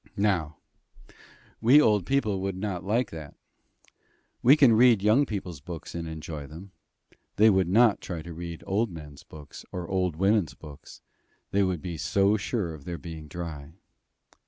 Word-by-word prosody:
Now, 85 -7 0 1.0
we 125 +6 +7
old 105 - +3
people 110 -9 0
would 95 -1 -3
not 95 -2 -4
like 115 +6 0
that. 80 -3 -9 1.1
We 135 +5 +6
can 135 -6 +6
read 115 -3 +5
young 120 +7 +4
people's 90 -8 -5
books 85 -1 -8
and 85 -1 -5
enjoy 80 -2 -7
them: 85 +6 -11 0.6
they 110 +2 +6
would 95 -3 +2
not 110 +3 +4
try 85 -4 -6
to 85 +1 -8
read 85 0 -7
old 105 +4 0
men's 75 -5 -11
books 75 -2 -12
or 90 -2 -5
old 90 -4 -1
women's 95 -4 +1
books; 75 -2 -13 0.5
they 100 - +2
would 95 -4 -1
be 85 -3 -5
so 100 +6 +2
sure 100 -4 -2
of 75 -3 -11
their 85 -1 -5
being 80 -3 -9
dry. 80 -2 -7
90 Hz, 160 wpm, -27 LUFS, 80-105 Hz, 1.1 s, we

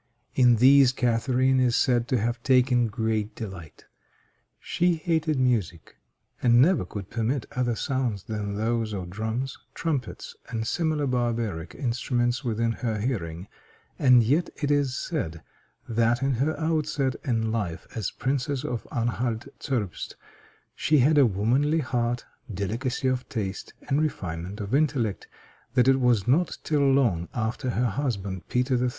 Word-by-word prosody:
In 125 -2 +5
these 130 +2 +6
Catharine 130 +1 +2
is 125 -2 +3
said 120 -3 +2
to 130 - +1
have 120 +2 -1
taken 125 -2 +3
great 110 -1 -2
delight. 95 -8 -8 0.7
She 175 0 +1
hated 160 -2 0
music, 110 -10 0 0.5
and 120 -1 +5
never 155 - +4
could 100 +1 -8
permit 120 +4 -1
other 120 -2 0
sounds 125 -6 -2
than 105 -2 -4
those 110 0 -1
of 90 -3 -5
drums, 110 +6 -3 0.2
trumpets, 145 -8 -3
and 115 -1 -3
similar 155 +2 0
barbaric 115 -9 -2
instruments 120 0 -1
within 115 -1 0
her 115 -2 -2
hearing; 95 -7 -3 0.5
and 125 -3 +6
yet 150 +10 +1
it 145 -1 0
is 140 -3 +1
said 85 - -3 0.4
that, 115 +2 +1
in 135 0 +2
her 140 +6 0
outset 150 -5 0
in 115 -5 0
life 100 -8 -3
as 110 -5 -2
Princess 135 0 -2
of 120 -2 -4
Anhalt 120 -2 -2
Zerbst, 110 -10 -3 0.6
she 155 - +2
had 145 +3 +5
a 135 - +6
womanly 130 +10 +1
heart, 120 -2 -1 0.3
delicacy 115 +7 -2
of 130 -1 -1
taste, 100 -5 -4
and 140 +2 +2
refinement 90 - -3
of 100 +3 -5
intellect; 135 -8 +1 0.5
that 125 -1 +4
it 135 0 +5
was 120 -4 +2
not 160 +8 +2
till 140 -3 +2
long 110 -11 +2
after 120 +3 -2
her 125 +1 0
husband, 100 -7 -3
Peter 125 0 +1
III. 125 - +2
120 Hz, 145 wpm, -26 LUFS, 110-135 Hz, 0.7 s, these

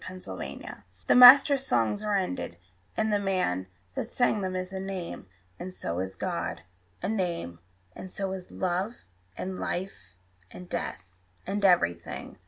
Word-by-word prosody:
Walt 185 0 -10
Whitman - - -7 0.2
The - - +4
master 270 +3 +10
songs 120 - +1
are 210 -1 0
ended, 90 - -3 0.4
and 220 -1 +1
the 205 - +3
man 180 - 0 0.3
That - - -3
sang 240 -3 +1
them 185 -1 -2
is 185 +1 -4
a 190 - -3
name. 190 - -5 0.3
And 185 +1 -7
so 85 +1 -3
is 95 0 -3
God 85 -2 -3 0.4
A - - 0
name; 175 - -2 0.4
and 185 - -8
so 195 -1 -2
is 185 -1 -6
love, 185 +5 -2 0.3
and 185 0 -4
life, 175 - -5 0.3
and 180 - -11
death, 95 - -6 0.2
And 200 +1 -2
everything. 85 - +1
185 Hz, 155 wpm, -28 LUFS, -, 0.4 s, master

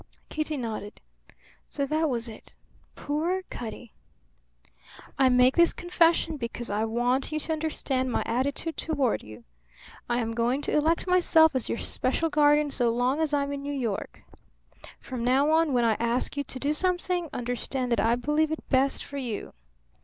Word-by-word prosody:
Kitty 310 -1 -2
nodded. 220 -4 -5 0.7
So 280 - -2
that 310 +2 0
was 235 -2 -2
it? 220 - -12 0.4
Poor 335 +6 -2
Cutty! 235 -1 -7 1.3
"I 265 -1 +5
make 250 +1 +4
this 340 -1 +5
confession 335 -3 +1
because 240 -2 -5
I 210 +2 0
want 245 +5 0
you 310 - -1
to 320 - -2
understand 275 -5 -1
my - - 0
attitude 280 +7 -1
toward 280 -7 0
you. 105 0 -12 0.7
I 240 - +1
am 230 -2 -2
going 240 +5 0
to - - -1
elect 315 +3 +2
myself 345 -4 +4
as 255 - 0
your - - -1
special 315 +8 0
guardian 295 0 +3
so 245 -3 +2
long 245 +5 0
as 315 -2 +1
I'm 285 -1 0
in 280 - -5
New 285 +1 -4
York. 235 -8 -4 0.8
From 250 -3 -6
now 270 +5 +3
on, 320 -1 +3
when 245 -2 +2
I 225 - +3
ask 235 +3 0
you 285 - -1
to 260 - -5
do 285 +3 0
something, 355 0 0
understand 245 +1 -3
that 235 - +2
I 225 +3 +3
believe 300 +5 0
it 315 - -5
best 270 0 +2
for 280 - -8
you. 240 -6 -5
275 Hz, 170 wpm, -27 LUFS, 240-310 Hz, 1.3 s, I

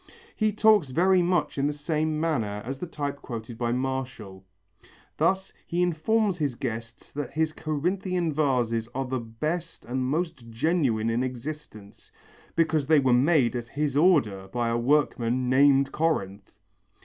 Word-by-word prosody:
He 215 -1 +1
talks 210 -7 +4
very 180 +6 +3
much 175 -5 0
in 140 - +2
the 150 - -1
same 155 +1 -1
manner 110 -11 -1
as 135 +2 -5
the 180 - -5
type 145 -3 -4
quoted 115 -1 -7
by 120 -1 0
Martial. 125 -6 -4 0.7
Thus 190 0 +1
he 175 +1 0
informs 180 +3 +1
his 145 -5 -1
guests 115 -2 -6
that 145 -3 -5
his 160 0 0
Corinthian 175 +2 -1
vases 120 -6 0
are 135 0 -1
the 130 0 -2
best 150 +10 -4
and 130 +2 -2
most 135 -3 -2
genuine 115 -3 +1
in 115 +2 0
existence, 130 -5 -7 0.4
because 160 -4 +1
they 160 0 +5
were 130 -3 +3
made 130 -1 +3
at 120 -1 -4
his 145 +2 -2
order 135 - +3
by 120 +2 -1
a 115 - 0
workman 125 -2 +1
named 135 0 +4
Corinth. 100 -12 -2
140 Hz, 150 wpm, -26 LUFS, 120-160 Hz, 0.7 s, they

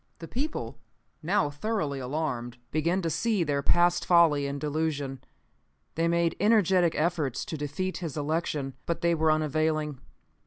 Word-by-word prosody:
The 165 - -9
people, 295 - -4 0.4
now 160 -3 +1
thoroughly 145 -3 -2
alarmed, 125 -3 -3
began 170 +5 +1
to 165 - 0
see 215 0 +1
their 145 -3 0
past 175 +3 +3
folly 160 -5 +4
and 140 0 -4
delusion. 145 -3 -2 0.7
They 165 +1 +1
made 170 -1 +1
energetic 190 -5 +3
efforts 155 -5 0
to - - -5
defeat 150 +6 -3
his 165 -5 -5
election. 150 -2 -2
But 170 - -2
they 170 0 +3
were 160 -1 +3
unavailing. 155 -1 0
160 Hz, 145 wpm, -28 LUFS, 145-170 Hz, 0.7 s, folly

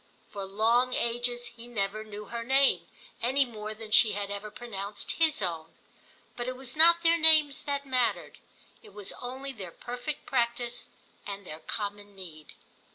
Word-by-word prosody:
For 200 -1 -5
long 230 +6 +2
ages 240 +1 0
he 235 +1 -10
never 215 -2 -2
knew 210 -1 -8
her 235 +1 -5
name, 260 -9 +3 0.3
any 265 +4 +3
more 215 -3 -7
than 215 0 -10
she 220 -1 +6
had 200 0 -3
ever 205 +1 -5
pronounced 205 -2 -5
his 315 -9 +3
own; 165 -3 -4 0.6
but 240 0 -4
it 255 - -3
was 260 0 -4
not 340 +2 +6
their 335 0 +4
names 310 -3 +6
that 280 -1 -2
mattered, 255 -3 0 0.4
it 430 - -16
was 205 -2 -3
only 260 +3 -5
their 200 -8 -8
perfect 245 - -6
practice 240 -1 0 0.4
and 200 -1 -6
their 155 -2 -8
common 205 +1 -5
need. 165 -5 -11
235 Hz, 160 wpm, -29 LUFS, 205-260 Hz, 0.6 s, she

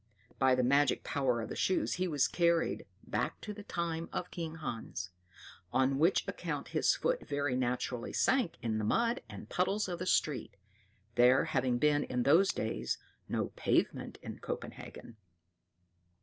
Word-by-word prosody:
By 130 -1 +5
the 125 - +1
magic 140 +2 +3
power 130 -4 0
of 110 - -5
the - - -5
shoes 185 - +1
he 185 - +2
was 145 -5 +2
carried 170 -1 +1 0.2
back - - -2
to 210 - -5
the 210 - -9
times 170 -4 -3
of 175 - -4
King 165 -2 -4
Hans; 115 - -5 0.6
on 130 +1 +2
which 170 +5 +3
account - - -4
his - - +3
foot - - -1
very 145 -2 0
naturally 125 -1 -1
sank 255 -10 +2
in 110 -2 0
the - - -2
mud 235 - +1
and - - -9
puddles 195 +3 0
of 175 -2 -4
the 180 - -3
street, 130 - 0 0.6
there 125 +2 +5
having 125 -2 +1
been 145 +2 +3
in 125 -1 -1
those 165 +9 +5
days 65 - -2 0.3
no - - -1
pavement - - 0
in - - -7
Copenhagen. 115 - -7
145 Hz, 160 wpm, -33 LUFS, 125-175 Hz, 0.6 s, By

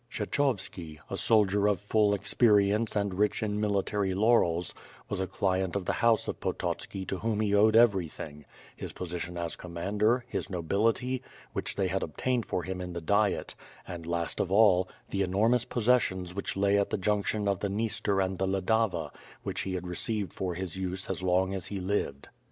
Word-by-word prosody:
KHhechovski 100 - -1
— - - -32
a - - -1
soldier 105 -2 +3
of 100 -3 +2
full 105 0 +2
experience 105 +1 +3
and 100 -2 0
rich 105 +3 +1
in 105 -1 -1
mili 100 -2 +1
tary 100 -3 -1
laurels, 95 -6 +3 0.3
was 100 - -3
a 95 - -1
client 95 0 0
of 100 -2 -2
the - - 0
house 115 -2 +4
of - - -4
Pototski 95 -1 -3
to 95 - -3
whom 110 -2 -1
he 105 -2 +1
owed 110 +2 +5
everything; 85 -9 +2 0.3
his - - -6
position 90 0 -4
as 85 -1 -3
commander, 105 +8 0
his - - -3
nobility, 110 +8 0 0.3
which - - -3
they 100 - 0
had 95 +1 -1
obtained 120 - -1
for 90 - -2
him 95 0 -4
in 90 -1 -5
the 85 - -3
Diet; 100 +4 +1 0.3
and 85 -2 -7
last 85 -1 -1
of 95 - -1
all, 95 -3 +5 0.2
the 100 - 0
enormous 110 +6 +2
possessions 115 -7 +1
which 100 0 -4
lay 100 +1 +3
at 100 - 0
the - - -1
junction 105 +1 0
of 100 -2 +1
the 100 - -1
Dniester 105 -1 0
and 95 -1 -5
the 95 - +1
Ladava, 95 -4 0 0.3
which - - -2
he 95 -1 -3
had 90 0 -4
received 95 +2 -2
for 90 -2 -3
his 95 -1 -4
use 95 0 -3
as - - -4
long 95 +1 +2
as 95 -2 -4
he 100 - -4
lived. 90 -7 -2
100 Hz, 190 wpm, -29 LUFS, 90-105 Hz, 0.3 s, owed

